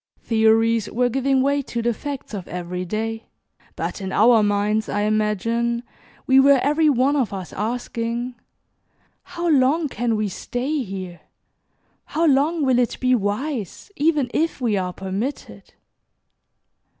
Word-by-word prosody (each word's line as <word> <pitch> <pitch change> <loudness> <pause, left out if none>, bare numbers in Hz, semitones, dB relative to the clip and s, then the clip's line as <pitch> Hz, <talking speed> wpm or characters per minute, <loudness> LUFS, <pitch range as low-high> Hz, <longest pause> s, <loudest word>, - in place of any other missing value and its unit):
Theories 225 0 +3
were 245 +1 +1
giving 265 +1 +1
way 280 +1 +1
to 235 -3 -4
the 235 0 +1
facts 280 0 -7
of 195 -4 -5
every 180 +1 -5
day, 225 +4 -3 0.5
but - - -4
in 190 0 -4
our 225 +2 +5
minds, 205 +1 +1
I 205 - -1
imagine, 215 +3 0 0.4
we 265 0 +5
were 275 0 +6
every 300 +2 +3
one 270 +1 +2
of 250 -7 0
us 190 -3 -6
asking, 235 +2 -3 0.9
"How 345 -2 -5
long 300 +1 +3
CAN 235 -1 -1
we 215 -1 0
stay 260 - -3
here? 185 -6 -7 0.8
How 320 +3 0
long 300 +2 +2
will 255 -2 +3
it 245 - 0
be 255 0 +2
wise, 225 - -2
even 295 -5 +1
if 325 -1 0
we 235 -5 +1
are 185 -2 -1
permitted?" 195 +9 -6
235 Hz, 140 wpm, -22 LUFS, 210-275 Hz, 0.9 s, were